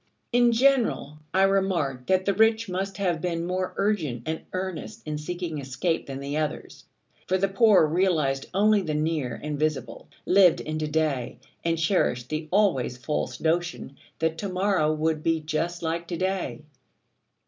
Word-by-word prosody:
In 240 0 +4
general, 235 - +2
I 190 +2 +3
remarked 180 -10 +1
that 185 0 +2
the 200 - +2
rich 225 +2 +3
must 190 +1 -3
have 175 -5 0
been 170 -2 -2
more 185 +1 -2
urgent 160 - 0
and 160 0 -3
earnest 190 +4 -5
in 150 -1 -3
seeking 170 0 -4
escape 140 +5 -2
than 135 -1 -5
the 140 +2 -3
others: 155 -1 -4 0.4
for 185 - +2
the 195 +1 +1
poor 195 -3 +5
realised 155 -5 +1
only 210 +2 +3
the 155 -5 -2
near 150 -6 -1
and 150 -1 -3
visible, 140 -7 -2 0.2
lived 185 -3 +5
in 155 0 -4
to 155 - -1
day, 150 -5 -1 0.3
and 165 0 +1
cherished 160 -8 +1
the 155 0 -3
always 180 -11 +2
false 150 +4 -3
notion 170 -3 -1 0.2
that 160 0 -1
to 200 - -3
morrow 185 -4 +1
would 155 0 0
be 165 0 +1
just 165 +3 -3
like 165 +1 -2
to 170 - -3
day. 185 -4 -2
165 Hz, 165 wpm, -26 LUFS, 150-190 Hz, 0.4 s, poor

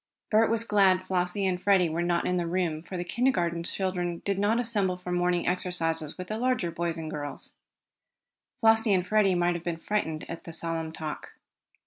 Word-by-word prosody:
Bert 220 +1 +4
was 230 0 +1
glad 195 -4 +3
Flossie 185 +1 +1
and 180 -1 0
Freddie 195 -3 +4
were 165 +2 -2
not 175 0 0
in 180 - +1
the 175 -1 -1
room, 170 -3 -1
for 185 +2 -7
the 175 - -2
kindergarten 175 -5 0
children 175 -1 -2
did 200 -1 0
not 210 +4 +2
assemble 205 -6 +1
for 180 0 -7
morning 175 0 +1
exercises 165 -4 -1
with 185 - -5
the 215 +1 -3
larger 250 -9 0
boys 170 0 -2
and 160 -1 -5
girls. 145 -1 -6 1.1
Flossie 225 -2 +5
and 180 -1 0
Freddie 195 -1 +3
might 175 0 +2
have 170 -1 -5
been 170 -1 -2
frightened 165 -4 -2
at 170 - -7
the 165 - -8
solemn 165 -1 -3
talk. 155 -1 -6
180 Hz, 190 wpm, -28 LUFS, 170-200 Hz, 1.1 s, Flossie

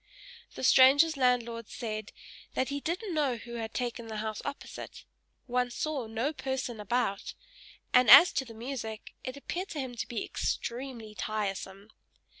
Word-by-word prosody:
The - - -6
stranger's 275 +5 +7
landlord 240 -3 +1
said 215 -2 -5 0.4
that 260 - 0
he 285 0 -2
didn't 360 +6 -3
know 290 -5 +1
who 235 0 -8
had 225 -1 -4
taken 240 -2 -3
the 220 -1 -5
house 215 0 -3
opposite, 285 0 -7 0.4
one 250 -1 0
saw 275 -1 -3
no 230 +7 -1
person 265 -5 -3
about, 210 -1 -1 0.6
and 250 -3 +6
as 280 +9 +11
to 265 - 0
the 230 -3 -12
music, 225 -2 -6
it 255 +2 -5
appeared 360 +6 -4
to 310 - -5
him 260 -2 -4
to - - -3
be 235 - -3
extremely 235 -3 -4
tiresome. 200 -1 -4
245 Hz, 155 wpm, -30 LUFS, 220-270 Hz, 0.6 s, as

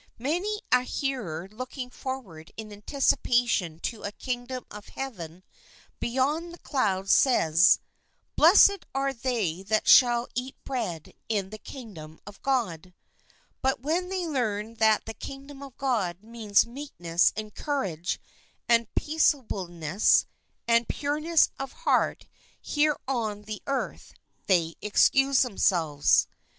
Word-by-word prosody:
Many 360 - -2
a 250 - +5
hearer 245 - -3
looking 250 +2 -7
forward 215 -15 -7
in 215 -1 -8
anticipation 235 - +1
to 225 - -4
a 205 - -4
Kingdom 250 +2 -5
of 210 0 -10
Heaven 185 -10 -7 0.6
beyond 290 +8 -1
the 345 - -11
clouds 195 - 0
says, 175 - +5 0.3
" - - -45
Blessed 400 +4 +6
are 275 0 0
they 230 -9 -2
that 215 +2 0
shall 240 -1 +6
eat 250 +2 -4
bread 215 - -4 0.2
in 200 -3 -1
the 215 - -8
Kingdom 185 - -10
of 205 0 -12
God 185 - -2 0.3
"; - - -35
but 265 -2 0
when 340 +6 -1
they 375 -2 -2
learn 225 -7 -2
that 220 -1 +3
the 225 - -6
Kingdom 275 +3 -9
of 275 -2 -11
God 210 -9 -1
means 220 -3 +2
meekness 215 - 0
and 215 -1 -6
courage 190 - -2 0.5
and 235 -2 +3
peaceableness 195 - +1 0.4
and 235 0 +3
pureness 300 +3 +1
of 270 -1 -5
heart - - 0 0.3
here 300 0 +1
on 220 -6 -2
the 210 0 -7
earth, 275 -1 -3 0.3
they 170 -4 +2
excuse 270 +5 +4
themselves. 170 - +2
235 Hz, 125 wpm, -27 LUFS, 195-270 Hz, 0.6 s, Blessed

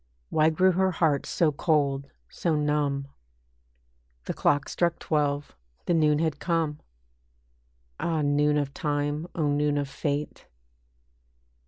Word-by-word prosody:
Why 155 0 +4
grew 185 +4 +3
her 190 +1 +2
heart 155 -5 +1
so 165 -3 +2
cold, 140 -3 0 0.2
so 165 -3 -1
numb? 145 -2 0 1.2
The - - -2
clock 145 -1 +1
struck 170 -1 0
twelve, 145 -2 -1 0.3
the 175 - +1
noon 155 -2 +3
had 155 -2 -1
come. 165 -4 -1 1.2
Ah! 160 -3 0
noon 145 +1 +2
of 140 -2 -2
time! 145 +2 -2
O 155 -3 0
noon 145 0 +1
of 145 -1 -1
fate! 145 +2 -4
150 Hz, 125 wpm, -27 LUFS, 145-160 Hz, 1.2 s, Why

